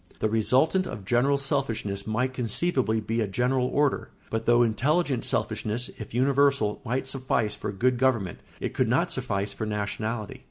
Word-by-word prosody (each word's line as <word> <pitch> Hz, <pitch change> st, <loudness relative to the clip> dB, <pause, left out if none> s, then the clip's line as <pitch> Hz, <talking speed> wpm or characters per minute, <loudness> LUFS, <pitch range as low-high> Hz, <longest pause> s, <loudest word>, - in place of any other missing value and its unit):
The 110 Hz, -, 0 dB
resultant 130 Hz, -, +2 dB
of 100 Hz, -4 st, -7 dB
general 125 Hz, +6 st, +3 dB
selfishness 115 Hz, -8 st, -2 dB
might 125 Hz, +4 st, 0 dB
conceivably 125 Hz, -, +1 dB
be 115 Hz, +2 st, -1 dB
a 110 Hz, -, 0 dB
general 125 Hz, +5 st, +1 dB
order; 145 Hz, +1 st, +1 dB, 0.2 s
but 115 Hz, 0 st, -2 dB
though 120 Hz, 0 st, +6 dB
intelligent 130 Hz, +4 st, +1 dB
selfishness, 115 Hz, +3 st, -1 dB
if 110 Hz, -, -7 dB
universal, 135 Hz, -3 st, +2 dB
might 130 Hz, +2 st, -1 dB
suffice 130 Hz, -5 st, 0 dB
for 105 Hz, -, -4 dB
good 125 Hz, +5 st, +1 dB
government, 115 Hz, -10 st, +1 dB, 0.2 s
it -, -, -3 dB
could -, -, +1 dB
not -, -, +1 dB
suffice 100 Hz, +1 st, -2 dB
for 110 Hz, +2 st, -4 dB
nationality. 105 Hz, +1 st, -3 dB
120 Hz, 160 wpm, -26 LUFS, 110-130 Hz, 0.2 s, though